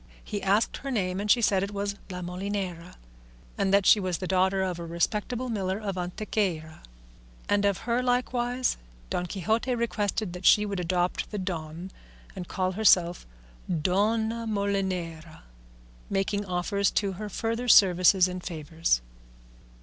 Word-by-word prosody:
He 205 -2 -4
asked 200 +3 +1
her 275 - -6
name, 190 -7 -1
and 210 - -4
she 235 +3 +5
said 195 -3 +3
it 200 - -2
was 200 0 -2 0.2
La 180 -1 -5
Molinera, 180 -1 -4 0.6
and 195 -1 0
that 200 -1 +4
she 215 - +7
was 185 -3 -1
the 185 - -5
daughter 190 +1 +2
of 180 -2 -3
a - - -5
respectable 210 +9 -1
miller 195 -5 -2
of 205 -3 -4
Antequera; 180 -3 -3 0.7
and 205 0 +2
of 200 -2 0
her 240 +1 +1
likewise 250 0 0 0.3
Don 180 - -1
Quixote 220 +7 -1
requested 215 -4 -1
that 180 +1 -8
she 210 +2 +6
would 200 -2 -3
adopt 180 0 -1
the 210 - -5
"Don" 175 -1 -5 0.4
and 180 -2 -6
call 185 -1 -1
herself 180 - +3 0.4
Dona 220 +7 0
Molinera, 190 -6 -2 0.7
making 200 +1 -1
offers 195 +2 0
to 200 -2 0
her 210 +3 -6
further 230 +4 -2
services 185 -3 +6
and 180 0 -6
favours. 160 - -1
195 Hz, 150 wpm, -27 LUFS, 180-210 Hz, 0.7 s, she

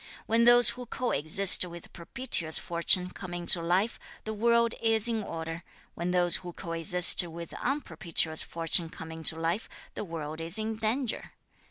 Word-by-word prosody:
When 230 +1 +1
those 240 -1 +8
who 250 0 -10
coexist 195 -6 +2
with 175 -1 -11
propitious 170 - -2
fortune 180 +2 +3
come 180 -2 -9
into 175 0 +2
life, 185 +7 -1 0.2
the 220 - -5
world 235 +1 +1
is 225 -1 +2
in 225 -2 -2
order; 165 -3 -7 0.3
when 170 +1 -5
those 180 -1 +2
who 175 -1 -10
coexist 170 +1 +2
with 170 -1 -9
unpropitious 170 - -1
fortune 165 0 -1
come 160 0 -10
into 160 0 +1
life, 165 +6 -3 0.2
the - - -6
world 160 -3 -7
is 165 +4 +1
in 220 0 -4
danger. 225 +3 -3
180 Hz, 155 wpm, -27 LUFS, 165-225 Hz, 0.3 s, those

